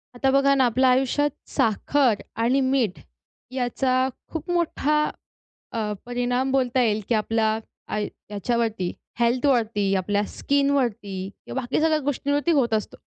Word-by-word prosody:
आता 265 +2 +1
बघा 275 +1 +4
ना 265 -2 +4
आपल्या 255 +2 +3
आयुष्यात 265 +3 +2 0.2
साखर 230 +2 +2 0.2
आणि 255 +4 +3
मीठ 260 -7 +1 0.5
याचा 255 0 +1 0.2
खूप 325 +2 -5
मोठा 305 -3 +1 0.7
अ, 215 -2 -2
परिणाम 245 +2 0
बोलता 255 -1 +2
येईल, 215 -3 +1
की 235 - +3
आपला 220 0 +1 0.3
आ 210 - -2
याच्यावरती 210 -1 -2 0.3
हेल्थवरती, 235 -5 +2
आपल्या 200 +2 0
स्किनवरती 240 -9 0 0.2
किंवा 265 - -3
बाकी 245 +1 -1
सगळ्या 315 -1 +3
गोष्टींवरती 285 +2 0
होत 260 -8 +2
असतो. 215 -1 -2
245 Hz, 130 wpm, -24 LUFS, 220-275 Hz, 0.7 s, बघा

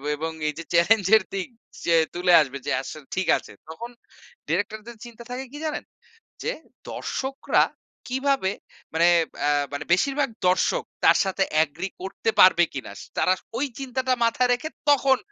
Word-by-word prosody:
এবং 160 +2 -3 0.2
এই - - -3
যে - - -5
চ্যালেঞ্জের 200 +3 +5
দিক 190 -2 -2 0.4
যে 170 - +4 0.2
তুলে 180 0 +3
আসবে 140 -1 -3
যে, - - 0
আসলে 145 +1 -9
ঠিক 185 - -1
আছে। - - -12 0.2
তখন 235 +9 -7 0.6
ডিরেক্টরদের 215 +6 -2
চিন্তা 235 0 -11
থাকে 260 +2 -4
কি, 295 - -8
জানেন? 305 - -3 0.6
যে - - -1 0.4
দর্শকরা 270 +1 0 0.4
কিভাবে 265 -6 +1 0.4
মানে, 170 +2 +4 0.3
ব্যা 145 - 0 0.2
মানে 145 +1 -4
বেশিরভাগ 275 +8 +2 0.2
দর্শক, 185 +1 +2 0.2
তার - - +7
সাথে 190 0 -1 0.2
এগ্রি 170 +6 -6
করতে 195 +3 -2
পারবে 175 -2 +7
কিনা? 130 -7 -6 0.3
তারা 185 - +4 0.3
ওই 285 - +1
চিন্তাটা 260 -1 -1
মাথায় 245 +2 +2
রেখে, 245 +6 -1 0.2
তখন 270 -2 +4
205 Hz, 150 wpm, -24 LUFS, 170-260 Hz, 0.6 s, তার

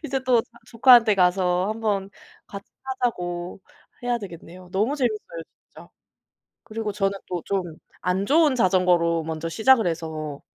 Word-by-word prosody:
이제 270 -2 -2
또 250 -2 +4
자 - - -27 0.2
조카한테 230 -3 +5
가서 180 0 +2
한번 210 -3 -2 0.4
같이 200 -1 -9 0.2
타자고 180 -9 -3 0.4
해야 245 0 +1
되겠네요. 180 -2 -11
너무 210 +9 0
재밌어요 215 - -3 0.2
진짜. - - -15 0.7
그리고 220 -2 -5
저는 195 -1 -1
또 175 -2 -4
좀 195 -2 -1 0.4
안 185 +2 0
좋은 300 -1 +4
자전거로 180 -5 +2
먼저 160 +1 -4
시작을 225 +4 +3
해서 155 -3 -4
195 Hz, 295 characters per minute, -24 LUFS, 175-230 Hz, 0.7 s, 조카한테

